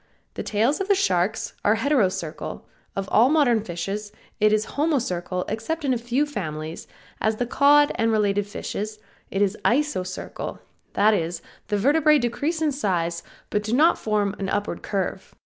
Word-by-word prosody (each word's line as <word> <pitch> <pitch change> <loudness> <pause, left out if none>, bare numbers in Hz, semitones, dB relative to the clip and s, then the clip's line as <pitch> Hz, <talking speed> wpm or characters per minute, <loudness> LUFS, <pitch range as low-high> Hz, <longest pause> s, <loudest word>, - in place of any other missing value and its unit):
The - - -4
tails 230 - +1
of 390 - -3
all 400 - +5
sharks 190 - 0
are 210 - +4
heterocercal, 200 - -1 0.3
of 195 0 -3
all 235 +4 +5
modern 265 -8 +3
fishes 195 +3 -4 0.3
it 215 0 +4
is 215 0 +2
homocercal 200 - -1
except 290 +9 -3
in 265 - +2
a - - +1
few 240 +5 0
families, 160 - -5 0.3
as 220 0 +1
the 245 - -1
cod 290 +3 +5
and 225 +1 +1
related 205 -2 +1
fishes, 215 0 -5 0.3
it 195 +1 +1
is 200 0 0
Isocercal; 235 -9 -1 0.4
that 215 +2 +4
is, 170 -3 -2 0.2
the 205 - 0
vertebrae 300 +7 +4
decrease 290 +6 -1
in 305 - +2
size, 175 - -1 0.3
but 210 - +1
do 215 +2 -3
not 310 +7 +4
form 210 -2 0
an 195 -1 -2
upward 205 +1 -2
curve. 195 -3 -3
215 Hz, 160 wpm, -24 LUFS, 195-280 Hz, 0.4 s, all